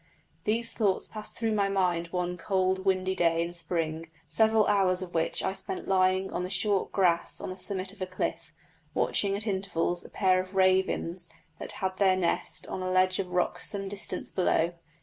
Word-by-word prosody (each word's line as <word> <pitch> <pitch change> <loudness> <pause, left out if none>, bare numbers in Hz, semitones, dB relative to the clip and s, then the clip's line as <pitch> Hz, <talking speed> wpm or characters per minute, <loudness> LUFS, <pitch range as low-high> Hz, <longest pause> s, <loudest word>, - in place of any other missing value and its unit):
These 230 +2 +1
thoughts 205 -5 +1
passed 215 -1 -9
through 225 -1 0
my 200 -2 +1
mind 180 -3 +1
one 180 0 -2
cold, 190 +1 0
windy 190 -1 +1
day 165 -2 +2
in 170 +1 -5
spring, 165 -2 -1 0.2
several 220 -1 +3
hours 190 -3 +3
of 180 - -9
which 165 -1 0
I 190 - 0
spent 190 -1 -1
lying 185 0 +2
on - - -1
the 180 - -3
short 195 +1 +1
grass 175 -3 +1
on - - -5
the 185 - -7
summit 190 -1 -1
of 205 - -15
a 185 - -1
cliff, 185 - -3 0.4
watching 200 -1 +2
at 205 +2 -3
intervals 190 -4 0
a - - -11
pair 185 -2 +2
of 185 +1 -11
ravens 185 -2 +2 0.3
that - - -5
had 190 -1 -3
their 190 -2 +4
nest 180 -2 -1
on 185 - -5
a 185 - -2
ledge 185 0 +3
of 190 -2 -2
rock 180 0 0
some 195 -1 -3
distance 195 0 -3
below. 175 -2 +1
185 Hz, 190 wpm, -28 LUFS, 180-195 Hz, 0.4 s, their